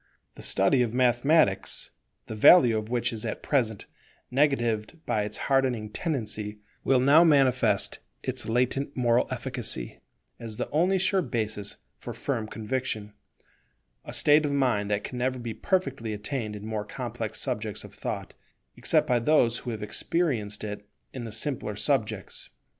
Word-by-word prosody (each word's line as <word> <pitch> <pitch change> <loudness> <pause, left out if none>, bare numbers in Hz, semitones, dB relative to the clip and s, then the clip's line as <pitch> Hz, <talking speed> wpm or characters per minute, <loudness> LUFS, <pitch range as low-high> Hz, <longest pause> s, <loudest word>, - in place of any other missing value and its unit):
The - - -12
study 95 +7 +2
of 120 -1 -1
Mathematics, 125 -2 +2 0.3
the - - -7
value 120 +2 +7
of 110 0 -3
which 120 -1 0
is 110 - -4
at 110 - -4
present 115 -7 0 0.5
negatived 125 -3 +1
by 105 -1 0
its 105 - -3
hardening 130 -6 +1
tendency, 110 - -3 0.3
will 135 -1 +3
now 140 +6 +6
manifest 135 -6 +3 0.2
its - - 0
latent 125 +4 0
moral 120 -1 +3
efficacy, 125 - -2 0.4
as 110 -2 -7
the - - -2
only 180 +6 +3
sure 190 +1 +2
basis 110 - -3 0.2
for - - -7
firm 110 -2 -3
conviction; 110 -2 -4 0.9
a - - -8
state 150 +1 +4
of 145 - 0
mind 125 -8 +1
that 105 0 0
can 125 - -6
never 130 +1 0
be 120 -2 -5
perfectly 135 - -1
attained 105 0 -3
in 105 0 -8
more 110 -1 -3
complex 105 - -5
subjects - - -3
of - - -12
thought, - - -5 0.4
except - - +2
by 125 -1 +2
those 120 -2 +3
who - - -7
have 110 -3 -4
experienced 110 -5 -1
it 105 -1 -6 0.2
in 125 -3 -6
the 115 - -6
simpler 115 -2 -2
subjects. 115 0 -2
120 Hz, 155 wpm, -27 LUFS, 105-135 Hz, 0.9 s, value